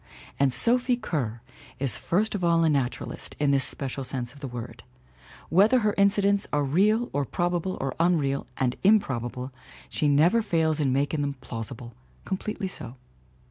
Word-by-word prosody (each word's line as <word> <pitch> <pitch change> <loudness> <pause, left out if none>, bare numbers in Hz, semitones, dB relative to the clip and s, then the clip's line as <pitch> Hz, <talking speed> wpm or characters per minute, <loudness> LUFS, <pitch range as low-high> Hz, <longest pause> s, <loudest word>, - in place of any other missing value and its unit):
And 140 -1 +4
Sophie 245 - +2
Kerr 130 - -3 0.3
is 130 -5 0
first 210 +6 0
of 200 -3 -3
all 170 -1 +3
a 160 - +4
naturalist 135 -4 -3
in 145 -1 +2
this 135 -1 +3
special 135 0 -2
sense 125 -1 -4
of 145 - -15
the 140 - -5
word. 120 -1 -7 0.7
Whether 210 +9 +5
her 210 -1 +2
incidents 200 0 +3
are 145 0 +1
real 210 - +2
or 145 - +1
probable 175 +5 -1
or 135 -1 -2
unreal 155 -5 +1
and 125 -1 0
improbable 130 - +1 0.4
she 150 - 0
never 160 +11 +4
fails 160 -6 +1
in 140 -3 +2
making 145 +3 0
them 140 -1 -2
plausi 115 -1 -6
ble, 120 0 -10 0.3
completely 195 +1 -3
so. 125 -9 -8
150 Hz, 165 wpm, -26 LUFS, 130-195 Hz, 0.7 s, Whether